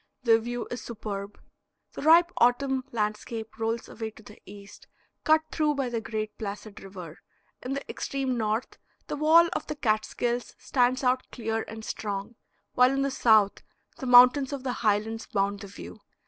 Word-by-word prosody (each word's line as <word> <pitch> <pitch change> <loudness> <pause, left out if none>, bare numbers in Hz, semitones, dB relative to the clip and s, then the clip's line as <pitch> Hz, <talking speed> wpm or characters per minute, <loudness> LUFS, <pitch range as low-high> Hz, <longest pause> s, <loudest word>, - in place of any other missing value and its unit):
The 225 -2 +5
view 240 +1 -4
is 245 -1 -4
superb; 205 -3 -6 0.5
the - - -7
ripe 335 +3 +6
autumn 260 +2 +2
landscape 220 0 -4
rolls 225 +1 -2
away 220 -1 -6
to 220 0 -17
the 210 - -15
east, 200 0 -13 0.4
cut 315 0 +4
through 300 -2 +1
by 270 -3 -1
the 230 -1 -2
great 215 -1 -4
placid 205 0 -7
river; 180 -4 -10 0.4
in 255 - -4
the 275 - -5
extreme 270 -2 -3
north 220 +1 -2 0.3
the - - -4
wall 320 +3 +6
of - - -4
the 300 - -4
Catskills 235 0 -1
stands 255 0 +1
out 255 0 +1
clear 225 -2 -2
and 220 0 -8
strong, 200 +1 -4 0.4
while 250 0 +5
in 275 +1 0
the 275 - 0
south 215 -5 +3 0.4
the 265 - -6
mountains 250 +3 +7
of 280 -2 -5
the 255 -2 -2
Highlands 220 +1 0
bound 200 0 -1
the 200 - -9
view. 205 +2 -11
230 Hz, 170 wpm, -27 LUFS, 215-260 Hz, 0.5 s, mountains